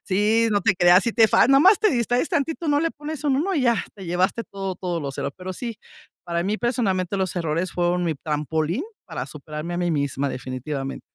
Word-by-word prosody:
Sí, 215 +4 +2
no 205 -1 +2
te 200 -4 +2
creas, 175 +1 +6
si 235 - 0
te 225 -2 +5
fal - - +4
nomás 335 +10 +6
te 435 - +3
distraes 245 +2 +1
tantito, 320 +3 -1
no 290 0 +3
le 330 0 +1
pones 305 +1 -7
un 270 -2 +2
1 370 +6 0
y 290 - +1
ya, 235 -2 +3 0.2
te 195 -2 -10
llevaste 185 +6 0
todo 195 -1 -5
todo 175 -2 -3
los 140 -2 -5
erro 140 - -2
Pero 185 0 -6
sí, 235 0 -5 0.5
para 170 0 -1
mí 210 +4 -1
personalmente 200 -6 0
los 190 -2 -1
errores 165 +2 -1
fueron 175 0 0
mi 160 -2 0
trampolín 155 - -2 0.2
para 160 -8 -5
superarme 150 +3 -6
a - - -2
mí 175 -1 0
misma 140 -1 -1
definitivamente. 135 +2 -5
185 Hz, 215 wpm, -23 LUFS, 160-235 Hz, 0.5 s, creas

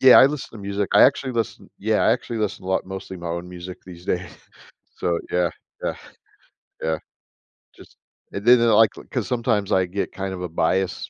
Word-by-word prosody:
Yeah, 130 -1 +9
I - - +9
listen 145 -1 -4
to 115 - -9
music, 100 0 -2
I - - +7
actually 130 -1 +4
listen 115 -4 -3
yeah, - - +1
I - - +5
actually 115 - -3
listen 105 -3 -2
a - - -6
lot 95 - +1
mostly 95 0 -7
my 85 -1 -6
own 85 +1 -4
music 90 0 -8
these 90 -1 -11
days, 90 -2 -2 0.7
so 85 -1 0
yeah, 90 -1 +2 0.3
yeah. - - -1 0.9
Yeah, 80 -1 0 0.8
just - - -16 0.4
and 100 - -4
then 120 0 +8
they'll, 115 -2 +4
like 110 0 +7
l - - -9
'cause - - -1
sometimes 115 -5 0
I 95 -1 +4
get 95 +3 -3
kind 95 -1 -4
of 90 - -6
a 90 - -3
bias 95 +3 0
95 Hz, 205 wpm, -23 LUFS, 90-115 Hz, 0.9 s, Yeah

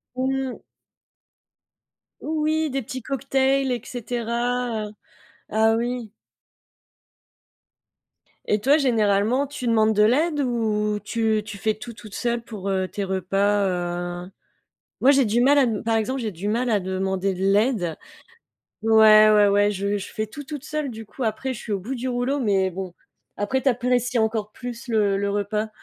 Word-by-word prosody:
Mmh. 265 0 -2 1.6
Oui, 310 0 0
des 270 0 -2
petits 260 +4 -6
cocktails 270 +1 0
et 240 -3 -2
cetera, 240 -1 -2
heu - - -11 0.6
ah 220 +1 +3
oui. 240 -2 -3 2.4
Et 210 - +2
toi 275 +8 +4
généralement, 230 -1 +2
tu 280 -3 -6
demandes 220 -1 +3
de 210 - +4
l'aide 295 +7 +2
ou 215 -4 0
tu 220 0 0
tu 210 - -8
fais 215 +1 0
tout 235 +2 -9
toute 215 -3 -11
seule 235 -1 -1
pour, 210 -4 -6
heu, 190 -1 0
tes 200 - -4
repas, 195 +2 +1 0.6
heu? - - -13 0.7
Moi, 270 - +6
j'ai 275 -1 +4
du 230 +2 +1
mal 280 +4 +5
à 270 - +5
dem 220 -3 -2
par 225 0 +1
exemple, 255 +5 -1
j'ai 225 -3 -2
du 185 +1 -7
mal 240 +3 0
à 210 - +3
demander 190 0 -1
de 180 - -8
l'aide. 200 -3 +2 0.9
Ouais, 215 -1 +7
ouais, 210 -1 +5
ouais, 205 +1 +3
je 200 0 -1
je 200 - -7
fais 215 - -2
tout 285 +7 -9
toute 290 -1 -7
seule 305 -3 -3
du 225 -2 -9
coup. 265 - -8
Après 240 +4 -2
je - - -8
suis 215 - -5
au 200 - 0
bout 240 +8 -5
du 255 +1 -3
rouleau, 250 +3 -1
mais 195 -5 +2
bon, 185 0 -6 0.5
après 260 +6 0
tu - - +3
apprécies 250 0 0
encore 220 -1 -1
plus 245 +1 -8
le 210 -4 +2
le 200 0 -1
repas. 205 +2 -1
225 Hz, 165 wpm, -23 LUFS, 205-255 Hz, 2.4 s, Ouais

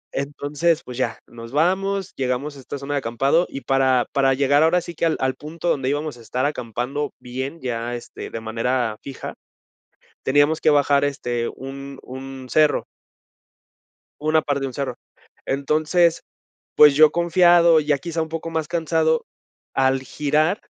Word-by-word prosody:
Entonces, 145 +3 -1
pues, 125 - -9
ya, 120 -3 -1
nos 115 -1 -11
vamos, 190 +5 0
llegamos 135 +3 -2
a - - -11
esta 135 +2 -7
zona 140 +1 -5
de - - +1
acampado 135 +8 +1
y 135 - -6
para 130 -2 +2
para 135 -1 +3
llegar 140 +2 +3
ahora 165 +3 +4
sí 175 0 -8
que 170 - -1
al 160 - 0
al 130 0 +1
punto 155 +5 -5
donde 135 -4 0
íbamos 145 -1 -2
a 120 - -14
estar 125 +4 -2
acampando 135 +1 -3
bien, 130 +6 -5
ya, 120 -1 -3
este, 120 - -8
de 115 - -5
manera 115 +1 -1
fija, 135 -2 -7 0.9
teníamos 145 +3 +3
que - - +3
bajar, 145 -1 +3
este, 120 -4 -2
un 135 +1 -8
un 130 0 -8
cerro. 155 +1 +3 1.3
Una 155 +1 +2
parte 145 -2 -1
de 135 - -1
un 130 - -7
cerro. 140 +1 -3 0.5
Entonces, 155 +5 +2 0.5
pues, 150 -2 +7
yo 155 0 +7
confiado, 170 -1 +5
ya 150 -1 +1
quizá 165 +3 -3
un 160 - -3
poco 165 +1 -4
más 160 -2 -2
cansado, 160 -1 +1 0.5
al 130 0 +2
girar, 150 - 0
145 Hz, 160 wpm, -22 LUFS, 130-160 Hz, 1.3 s, pues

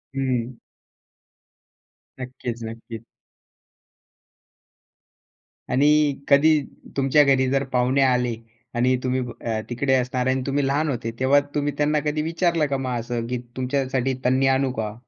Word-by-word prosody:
हं. 130 -2 -1 1.7
नक्कीच, 125 -2 -6
नक्कीच. 115 0 -8 2.7
आणि 135 +3 +3 0.4
कधी 155 +2 +5 0.4
तुमच्या 135 +2 +4
घरी 130 -2 +3
जर 135 0 +1
पाहुणे 125 +2 +2
आले 125 -3 +2 0.4
आणि 125 +2 +2
तुम्ही 130 0 0 0.2
अ, 110 -2 -2
तिकडे 130 +3 0
असणार. 125 0 0
आणि 130 0 +1
तुम्ही 140 0 0
लहान 150 +3 0
होते. 115 -4 -3
तेव्हा 135 +2 +4 0.2
तुम्ही 145 0 0
त्यांना 150 +1 +2
कधी 150 0 0
विचारलं 165 0 +1
का 140 - -1
मग 125 -2 -2
असं, 120 0 -3
की 125 +1 -2 0.2
तुमच्यासाठी 130 0 -1
तन्नी 130 +2 +3
आणू 135 -1 0
का? 110 -3 -3
130 Hz, 125 wpm, -23 LUFS, 125-140 Hz, 2.7 s, कधी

